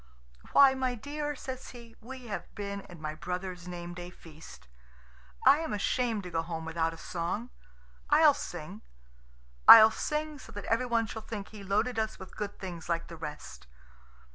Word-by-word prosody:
"Why, 275 Hz, -1 st, +8 dB
my 260 Hz, -1 st, -1 dB
dear" 295 Hz, +4 st, -4 dB
says 260 Hz, -1 st, -7 dB
he, 235 Hz, -2 st, -12 dB
"we 255 Hz, +2 st, -9 dB
have 210 Hz, -4 st, -6 dB
been 200 Hz, -1 st, -4 dB
at 175 Hz, -, -11 dB
my 155 Hz, -1 st, -4 dB
brother's 180 Hz, +2 st, -5 dB
name 175 Hz, -1 st, -6 dB
day 175 Hz, 0 st, -7 dB
feast. 160 Hz, -, -14 dB, 0.8 s
I 295 Hz, -, +7 dB
am 320 Hz, -6 st, -3 dB
ashamed 220 Hz, +1 st, 0 dB
to 180 Hz, -, -8 dB
go 165 Hz, -1 st, 0 dB
home 165 Hz, -1 st, -5 dB
without 165 Hz, 0 st, -1 dB
a 165 Hz, -, -10 dB
song. 180 Hz, +9 st, -4 dB, 0.6 s
I'll -, -, +7 dB
sing. -, -, -7 dB, 0.9 s
I'll 220 Hz, -1 st, +12 dB
sing 300 Hz, +2 st, -3 dB
so 225 Hz, -, -12 dB
that 205 Hz, -1 st, -7 dB
everyone 230 Hz, 0 st, +1 dB
shall 220 Hz, 0 st, -7 dB
think 215 Hz, -2 st, -7 dB
he 210 Hz, -2 st, -10 dB
loaded 215 Hz, +5 st, 0 dB
us 220 Hz, 0 st, -2 dB
with 190 Hz, -, -11 dB
good 205 Hz, -1 st, -5 dB
things 175 Hz, -3 st, -7 dB
like 170 Hz, -1 st, -1 dB
the 170 Hz, -, -8 dB
rest." 70 Hz, -, -8 dB
200 Hz, 170 wpm, -30 LUFS, 170-240 Hz, 0.9 s, I'll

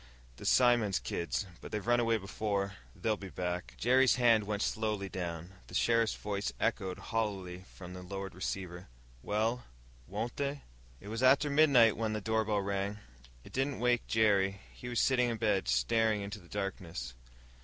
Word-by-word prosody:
"The -, -, -6 dB
Simmons 120 Hz, -6 st, +4 dB
kids. 85 Hz, +4 st, -2 dB, 0.2 s
But -, -, -9 dB
they've 105 Hz, -2 st, -3 dB
run 120 Hz, 0 st, +3 dB
away 115 Hz, -1 st, +2 dB
before. 100 Hz, -1 st, -2 dB, 0.2 s
They'll 110 Hz, -2 st, 0 dB
be 95 Hz, -, -8 dB
back." 90 Hz, -1 st, -4 dB
Jerry's 130 Hz, +2 st, +4 dB
hand 115 Hz, -4 st, +4 dB
went 105 Hz, 0 st, -1 dB
slowly 105 Hz, -3 st, -1 dB
down. 85 Hz, -1 st, -5 dB, 0.2 s
The 90 Hz, -, -9 dB
sheriff's 115 Hz, +1 st, +3 dB
voice 100 Hz, -1 st, -3 dB
echoed 95 Hz, -1 st, -1 dB, 0.2 s
hollowly 95 Hz, -5 st, -2 dB
from 90 Hz, -1 st, -9 dB
the 90 Hz, -, -8 dB
lowered 95 Hz, +1 st, -6 dB
receiver. 90 Hz, 0 st, -5 dB, 0.3 s
"Well, 110 Hz, -, 0 dB, 0.4 s
won't 120 Hz, 0 st, -4 dB
they?" 140 Hz, 0 st, -2 dB, 0.4 s
It 100 Hz, -, -10 dB
was 115 Hz, +2 st, -3 dB
after 135 Hz, +3 st, +5 dB
midnight 140 Hz, -7 st, +6 dB
when 110 Hz, -1 st, -1 dB
the 110 Hz, -, -1 dB
doorbell 110 Hz, -1 st, +1 dB
rang. 100 Hz, +1 st, -2 dB, 0.5 s
It -, -, -14 dB
didn't 135 Hz, +1 st, 0 dB
wake 120 Hz, 0 st, +1 dB
Jerry 100 Hz, -3 st, +2 dB
he 125 Hz, -, -8 dB
was 120 Hz, -, 0 dB
sitting 125 Hz, -2 st, +3 dB
in 115 Hz, -, -2 dB
bed, 105 Hz, -, +1 dB
staring 105 Hz, -, +2 dB
into 100 Hz, +2 st, -6 dB
the 85 Hz, -2 st, -18 dB
darkness. 90 Hz, -, -4 dB
105 Hz, 165 wpm, -32 LUFS, 95-115 Hz, 0.5 s, midnight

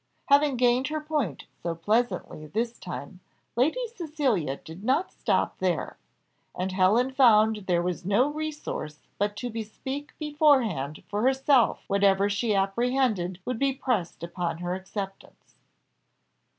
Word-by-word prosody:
Having 285 Hz, -1 st, +5 dB
gained 250 Hz, +2 st, +3 dB
her 310 Hz, +1 st, -2 dB
point 300 Hz, -, -2 dB, 0.2 s
so 170 Hz, -1 st, -2 dB
pleasantly 185 Hz, -4 st, -1 dB
this 230 Hz, +7 st, -2 dB
time, 140 Hz, +8 st, -7 dB, 0.4 s
Lady 315 Hz, -, +2 dB
Cecilia 270 Hz, -, -1 dB
did 165 Hz, +5 st, -11 dB
not 270 Hz, -, +1 dB
stop -, -, 0 dB
there; -, -, -1 dB, 0.6 s
and 185 Hz, +1 st, -2 dB
Helen 200 Hz, +8 st, +3 dB
found 220 Hz, -5 st, +4 dB
there 175 Hz, -2 st, +2 dB
was 180 Hz, -1 st, -2 dB
no 205 Hz, +8 st, +3 dB
resource 300 Hz, -, -5 dB, 0.2 s
but 205 Hz, +1 st, 0 dB
to 245 Hz, +2 st, -4 dB
bespeak 265 Hz, +6 st, -6 dB
beforehand 265 Hz, -, +2 dB
for 205 Hz, 0 st, -2 dB
herself 265 Hz, 0 st, +3 dB
whatever 200 Hz, 0 st, +3 dB
she 210 Hz, +1 st, +1 dB
apprehended 200 Hz, -2 st, +1 dB
would 250 Hz, -2 st, -2 dB
be 275 Hz, -1 st, +2 dB
pressed 230 Hz, -12 st, -2 dB
upon 170 Hz, -1 st, -3 dB
her 175 Hz, +1 st, -3 dB
acceptance. 195 Hz, +1 st, -7 dB
220 Hz, 130 wpm, -27 LUFS, 185-265 Hz, 0.6 s, Having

